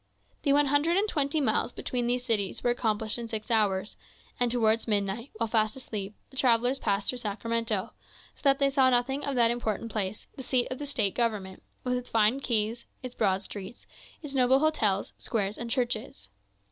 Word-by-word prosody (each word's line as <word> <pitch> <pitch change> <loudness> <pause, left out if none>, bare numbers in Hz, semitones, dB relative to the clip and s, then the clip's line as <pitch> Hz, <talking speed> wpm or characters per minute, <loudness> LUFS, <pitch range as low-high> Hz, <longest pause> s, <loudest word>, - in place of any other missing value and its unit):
The 280 - +2
one 290 +1 +5
hundred 290 +5 +2
and 410 +2 +2
twenty 290 -4 0
miles 240 -3 +1
between 245 -1 -2
these 245 +1 -1
cities 210 -6 0
were 245 - +3
accomplished 220 -2 -1
in 235 - -5
six 220 +1 -5
hours, 205 -3 +1 0.4
and 245 -1 +2
towards 230 -1 +2
midnight, 205 +4 -1
while 230 +1 -1
fast 215 -1 +1
asleep, 210 -6 -6 0.2
the 265 - -13
travellers 250 0 +3
passed 200 -1 0
through 250 - -1
Sacramento; 225 -1 -2 0.4
so - - -21
that 275 -1 +4
they 275 0 +2
saw 265 -2 +4
nothing 260 +3 +1
of 280 -1 -2
that 235 -1 +4
important 230 -1 -2
place, 205 -1 -3
the - - -7
seat 255 -1 +1
of 255 - -4
the 290 - -5
State 205 -8 +1
government, 210 -6 -1 0.2
with 250 - 0
its 250 - -7
fine 225 +4 +3
quays, 230 -2 0 0.2
its 250 -1 -6
broad 195 -4 +1
streets, 205 +4 -8 0.4
its 290 -2 -6
noble 260 0 +4
hotels, 275 -10 +1
squares, 205 -3 -1
and 235 - -5
churches. 225 - -2
235 Hz, 190 wpm, -28 LUFS, 215-260 Hz, 0.4 s, one